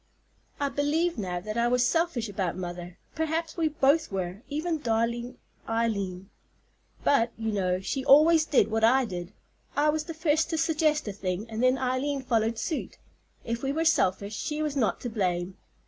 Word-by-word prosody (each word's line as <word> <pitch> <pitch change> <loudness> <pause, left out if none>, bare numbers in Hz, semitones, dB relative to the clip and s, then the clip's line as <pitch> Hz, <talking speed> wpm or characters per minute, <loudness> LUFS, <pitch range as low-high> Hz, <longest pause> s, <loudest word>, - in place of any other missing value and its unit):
I 285 -1 0
believe 300 +2 0
now 180 -3 -2
that 215 +4 -3
I 235 - +3
was 245 0 +3
selfish 325 -6 0
about 190 -4 -2
mother; 175 0 -6 0.2
perhaps 320 +1 -2
we 330 -2 +1
both 295 -1 +2
were, 185 +1 -3
even 315 +2 -2
darling 235 0 -1 0.3
Eileen; 200 -5 -2 0.7
but, 235 -4 +3
you 225 -1 -2
know, 185 -3 0
she 265 +7 -3
always 310 +4 +6
did 220 -7 +3
what 220 0 0
I 255 +3 +5
did. 180 -3 -6 0.4
I 295 +1 +3
was 305 0 0
the 330 - -7
first 315 0 +1
to 325 - -1
suggest 310 -3 +1
a 205 - -3
thing, 190 +2 -3
and 220 +1 -3
then 255 +1 +4
Eileen 265 +2 -1
followed 225 -2 +1
suit. 310 +6 -3 0.5
If 230 +1 -3
we 270 - -1
were 320 +3 -1
selfish 205 - +2
she 300 +6 -2
was 300 -2 -2
not 220 -9 +1
to 245 - -3
blame. 180 -3 -1
245 Hz, 180 wpm, -27 LUFS, 205-300 Hz, 0.7 s, always